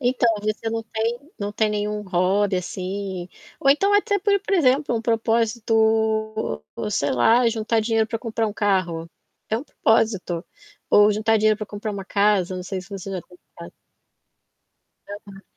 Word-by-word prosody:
Então, 245 Hz, -1 st, +2 dB
você 215 Hz, +1 st, -2 dB
não 225 Hz, 0 st, -2 dB
tem 225 Hz, +2 st, -2 dB, 0.2 s
não 205 Hz, 0 st, -3 dB
tem 215 Hz, 0 st, +1 dB
nenhum 210 Hz, 0 st, -2 dB
hobby 190 Hz, +1 st, +1 dB
assim, 185 Hz, 0 st, -4 dB, 0.3 s
ou 275 Hz, -, +4 dB
então 390 Hz, +8 st, +3 dB
até, 410 Hz, 0 st, +2 dB
por 400 Hz, 0 st, +2 dB
por 400 Hz, 0 st, -1 dB
exemplo, 280 Hz, -5 st, +2 dB
um 225 Hz, -, 0 dB
propósito, 220 Hz, -, +1 dB, 0.3 s
sei 140 Hz, -9 st, 0 dB
lá, 230 Hz, -, +4 dB
juntar 225 Hz, 0 st, 0 dB
dinheiro 225 Hz, 0 st, +1 dB
para 225 Hz, -, -3 dB
comprar 225 Hz, -1 st, -2 dB
um 210 Hz, -, -3 dB
carro? 185 Hz, -6 st, 0 dB, 0.4 s
É 220 Hz, -, 0 dB
um -, -, -7 dB
propósito. 200 Hz, -, 0 dB, 0.5 s
Ou 210 Hz, 0 st, +6 dB
juntar 220 Hz, +2 st, +2 dB
dinheiro 215 Hz, 0 st, +3 dB
para 215 Hz, -, -6 dB
comprar 205 Hz, +2 st, -5 dB
uma 195 Hz, -1 st, -6 dB
casa, 200 Hz, -2 st, +1 dB
não 180 Hz, -, -5 dB
sei 185 Hz, +1 st, -4 dB
se 180 Hz, -, -14 dB
você 195 Hz, 0 st, -6 dB
já 185 Hz, -2 st, -3 dB
tem 180 Hz, -, -19 dB, 0.2 s
casa. 170 Hz, -, -10 dB, 1.4 s
Aham. 200 Hz, -1 st, -10 dB
215 Hz, 165 wpm, -23 LUFS, 195-225 Hz, 1.4 s, Ou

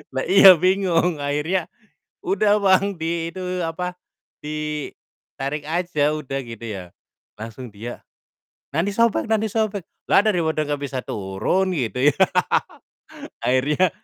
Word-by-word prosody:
Lah 130 Hz, -, 0 dB
iya, 190 Hz, -1 st, +9 dB
bingung, 180 Hz, -3 st, +2 dB
akhirnya, 150 Hz, +5 st, -1 dB, 0.6 s
"Udah, 205 Hz, +3 st, +2 dB
Bang, 195 Hz, -1 st, +3 dB
di 165 Hz, +1 st, -2 dB
itu, 180 Hz, -1 st, -4 dB
apa, 180 Hz, +2 st, -4 dB, 0.5 s
ditarik 150 Hz, -1 st, -6 dB
aja 160 Hz, -3 st, 0 dB
udah," 135 Hz, -2 st, -4 dB
gitu 115 Hz, -1 st, -9 dB
ya, 95 Hz, -4 st, -7 dB, 0.5 s
langsung 115 Hz, +1 st, -8 dB
dia, 115 Hz, +4 st, -8 dB, 0.7 s
"Nanti 185 Hz, +6 st, 0 dB
sobek 230 Hz, 0 st, +2 dB
nanti 220 Hz, 0 st, +1 dB
sobek." 210 Hz, -4 st, -1 dB, 0.3 s
Lah, -, -, +7 dB
daripada 160 Hz, -7 st, +1 dB
gak 145 Hz, -1 st, -2 dB
bisa 130 Hz, -2 st, -3 dB
turun, 105 Hz, -, -1 dB
gitu, 125 Hz, +2 st, +1 dB
ya. -, -, -20 dB, 1.3 s
Akhirnya 150 Hz, +8 st, +2 dB
165 Hz, 120 wpm, -22 LUFS, 140-185 Hz, 1.3 s, iya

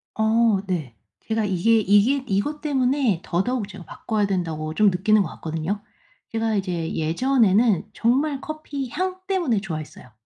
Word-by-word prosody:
어 220 Hz, -1 st, +3 dB
네. 155 Hz, -11 st, -3 dB, 0.3 s
제가 220 Hz, -1 st, -1 dB
이게 205 Hz, +4 st, +3 dB
이게 215 Hz, +7 st, +3 dB
이것 225 Hz, +10 st, -1 dB
때문에 265 Hz, -, +1 dB
더더욱 205 Hz, +5 st, -1 dB
제가 190 Hz, -3 st, -10 dB
바꿔야 210 Hz, +5 st, -2 dB
된다고 160 Hz, -5 st, -2 dB
좀 210 Hz, +4 st, +4 dB
느끼는 205 Hz, +4 st, +3 dB
것 160 Hz, -, -5 dB
같거든요. 165 Hz, +6 st, -3 dB, 0.5 s
제가 225 Hz, -1 st, 0 dB
이제 180 Hz, -5 st, -2 dB
예전에는 210 Hz, +3 st, +2 dB
정말 270 Hz, +4 st, +1 dB
커피 290 Hz, -4 st, -5 dB
향 370 Hz, +6 st, -3 dB
때문에 340 Hz, -, +1 dB
좋아했어요. 155 Hz, -, -7 dB
215 Hz, 315 characters per minute, -23 LUFS, 180-255 Hz, 0.5 s, 좀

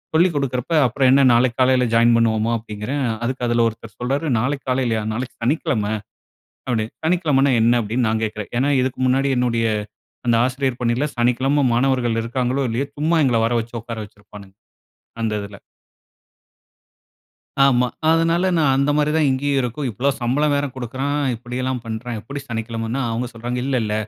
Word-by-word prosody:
சொல்லிக் 170 Hz, +1 st, +4 dB
குடுக்கிறப்ப, 135 Hz, +2 st, -2 dB
"அப்பறம் 130 Hz, +2 st, +2 dB
என்ன 135 Hz, 0 st, +5 dB
நாளைக்கு 120 Hz, +1 st, +2 dB
காலைல 130 Hz, -1 st, +4 dB
ஜாயின் 115 Hz, +1 st, +5 dB
பண்ணுவோமா?" 115 Hz, 0 st, +1 dB
அப்படீங்கறேன். 115 Hz, +5 st, -4 dB, 0.2 s
அதுக்கு 125 Hz, 0 st, -2 dB
அதுல 120 Hz, 0 st, +2 dB
ஒருத்தர் 110 Hz, -1 st, -13 dB
சொல்றாரு, 140 Hz, +6 st, -1 dB
"நாளைக்கு 135 Hz, +4 st, -2 dB
காலையிலயா? 125 Hz, -4 st, 0 dB
நாளைக்கு 125 Hz, +3 st, -5 dB
சனிக்கிழம" 120 Hz, -6 st, 0 dB, 0.8 s
அப்படின்னு. 115 Hz, -3 st, -1 dB
"சனிக்கிழமைன்னா 150 Hz, -6 st, +2 dB
என்ன?" 120 Hz, +2 st, +4 dB
அப்படீன்னு 115 Hz, +3 st, -1 dB
நான் 110 Hz, 0 st, 0 dB
கேட்குறேன். 105 Hz, -1 st, -6 dB
ஏன்னா 140 Hz, +3 st, +2 dB
இதுக்கு 130 Hz, 0 st, -2 dB
முன்னாடி 135 Hz, +2 st, +2 dB
என்னுடைய 115 Hz, -2 st, +1 dB, 0.6 s
அந்த 120 Hz, -, +4 dB
ஆசிரியர் 130 Hz, -1 st, -2 dB
பணியில 120 Hz, +5 st, +1 dB
சனிக்கிழமை 130 Hz, +4 st, +2 dB
மாணவர்கள் 120 Hz, -2 st, +1 dB
இருக்காங்களோ, 125 Hz, +3 st, -1 dB
இல்லையோ 130 Hz, +5 st, -2 dB
சும்மா 160 Hz, +3 st, +1 dB
எங்கள 120 Hz, -3 st, +2 dB
வர 115 Hz, -, 0 dB
வச்சு 115 Hz, +2 st, -11 dB
உட்கார 115 Hz, 0 st, -7 dB
வச்சிருப்பானுங்க, 100 Hz, -1 st, -15 dB, 0.7 s
அந்த 110 Hz, -1 st, 0 dB
இதுல. 100 Hz, 0 st, -9 dB, 2.1 s
ஆமா. 125 Hz, -2 st, +3 dB, 0.2 s
அதுனால 165 Hz, +3 st, +2 dB
நான், 140 Hz, -4 st, +3 dB
அந்த 140 Hz, +2 st, +2 dB
மாரி 150 Hz, 0 st, +2 dB
தான், 155 Hz, -2 st, +3 dB
இங்கயும் 135 Hz, +1 st, 0 dB
இருக்கும். 125 Hz, +4 st, -3 dB
இப்பலா 125 Hz, +7 st, 0 dB
சம்பளம் 145 Hz, +5 st, +1 dB
வேற 145 Hz, -, 0 dB
குடுக்குறான். 135 Hz, +4 st, -3 dB, 0.2 s
இப்படியெல்லாம் 125 Hz, +1 st, -4 dB
பண்றான். 115 Hz, +1 st, -5 dB
எப்படி 140 Hz, +6 st, -7 dB
சனிக்கிழமைனா, 115 Hz, +2 st, -3 dB
அவங்க 120 Hz, +2 st, -2 dB
சொல்றாங்க, 120 Hz, +2 st, -4 dB
இல்ல 135 Hz, -1 st, 0 dB
இல்ல. 105 Hz, -1 st, -2 dB
125 Hz, 155 wpm, -21 LUFS, 115-140 Hz, 2.1 s, என்ன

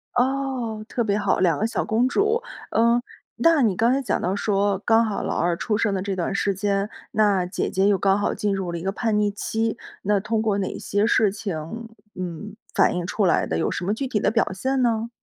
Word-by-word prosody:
哦， 255 Hz, -4 st, -1 dB
特 240 Hz, -, -1 dB
别 205 Hz, -1 st, +1 dB
好， 200 Hz, -2 st, +1 dB
2 170 Hz, -5 st, +2 dB
个 220 Hz, -, +1 dB
小 -, -, -1 dB
公 230 Hz, +3 st, +2 dB
主。 425 Hz, -, +1 dB, 0.3 s
嗯， 235 Hz, +2 st, +3 dB, 0.3 s
那 330 Hz, -3 st, +4 dB
你 215 Hz, -7 st, +2 dB
刚 230 Hz, +5 st, +3 dB
才 270 Hz, +2 st, +1 dB
讲 260 Hz, -, -1 dB
到 185 Hz, -, 0 dB
说 200 Hz, -1 st, +1 dB
刚 225 Hz, 0 st, +4 dB
好 210 Hz, -2 st, -2 dB
老 -, -, -2 dB
二 170 Hz, 0 st, +1 dB
出 210 Hz, +2 st, -1 dB
生 215 Hz, -2 st, +1 dB
的 190 Hz, -, -1 dB
这 195 Hz, 0 st, -2 dB
段 180 Hz, +1 st, -2 dB
时 200 Hz, 0 st, +1 dB
间， 200 Hz, +1 st, 0 dB, 0.2 s
那 205 Hz, -4 st, +2 dB
姐 180 Hz, +2 st, -2 dB
姐 190 Hz, +1 st, +2 dB
又 200 Hz, -, +3 dB
刚 195 Hz, 0 st, +2 dB
好 205 Hz, -, 0 dB
进 205 Hz, -1 st, -1 dB
入 190 Hz, -3 st, -3 dB
了 170 Hz, -, -3 dB
一 165 Hz, -, -6 dB
个 195 Hz, +2 st, -2 dB
叛 220 Hz, -1 st, 0 dB
逆 210 Hz, -1 st, +2 dB
期， 220 Hz, +3 st, -2 dB, 0.3 s
那 205 Hz, 0 st, +2 dB
通 220 Hz, +2 st, -1 dB
过 215 Hz, -2 st, +1 dB
哪 190 Hz, -, -3 dB
些 205 Hz, +1 st, 0 dB
事 220 Hz, -2 st, +3 dB
情， 200 Hz, -5 st, -4 dB, 0.6 s
嗯， 185 Hz, +3 st, -6 dB, 0.2 s
反 -, -, +3 dB
映 175 Hz, -1 st, -2 dB
出 205 Hz, +2 st, 0 dB
来 175 Hz, -, +3 dB
的？ 80 Hz, -, -2 dB
有 -, -, 0 dB
什 -, -, -3 dB
么 200 Hz, -, +1 dB
具 265 Hz, +5 st, -3 dB
体 230 Hz, -5 st, 0 dB
的 -, -, +2 dB
表 225 Hz, -3 st, +1 dB
现 260 Hz, +7 st, -1 dB
呢？ 230 Hz, -1 st, +1 dB
210 Hz, 250 characters per minute, -23 LUFS, 195-230 Hz, 0.6 s, 那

